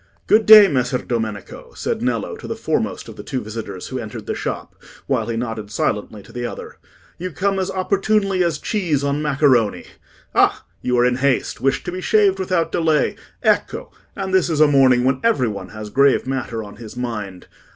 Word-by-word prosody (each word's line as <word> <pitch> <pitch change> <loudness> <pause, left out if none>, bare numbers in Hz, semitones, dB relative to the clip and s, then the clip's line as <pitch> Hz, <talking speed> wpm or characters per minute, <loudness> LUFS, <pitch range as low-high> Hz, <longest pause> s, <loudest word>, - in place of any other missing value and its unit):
"Good 215 0 +3
day, 215 -2 +10
Messer 130 -5 0
Domenico," 110 -5 -5
said - - -3
Nello - - -1
to - - -9
the - - -3
foremost - - -2
of - - -11
the - - -8
two 130 - -3
visitors 105 -4 -7
who 130 - -4
entered 110 -3 -7
the - - -2
shop, - - -5 0.3
while - - -1
he 115 -1 -2
nodded 115 -3 -4
silently 105 -1 -2
to - - -16
the 120 - -5
other. 120 - -7 0.4
"You 185 +2 -3
come 195 +4 -1
as 185 - -1
opportunely 195 0 +1
as 170 -4 0
cheese 165 -8 -1
on 140 +1 0
macaroni. 135 -7 +2 0.5
Ah! - - +2 0.2
you 125 0 0
are 120 - +4
in 125 0 +1
haste—wish 135 0 0
to 180 - -4
be 185 +1 -5
shaved 195 +1 +3
without 180 -3 0
delay—ecco! 160 -3 0 0.2
And 190 -2 -4
this 185 -2 +3
is 160 -3 -1
a 155 - +7
morning 130 -3 +4
when 130 +1 +1
every 220 - +2
one 105 -2 -6
has 110 -1 -8
grave 140 0 +3
matter 125 -4 -3
on 105 -1 -11
his 115 +1 -10
mind. 105 -7 -5
135 Hz, 190 wpm, -20 LUFS, 115-180 Hz, 0.5 s, day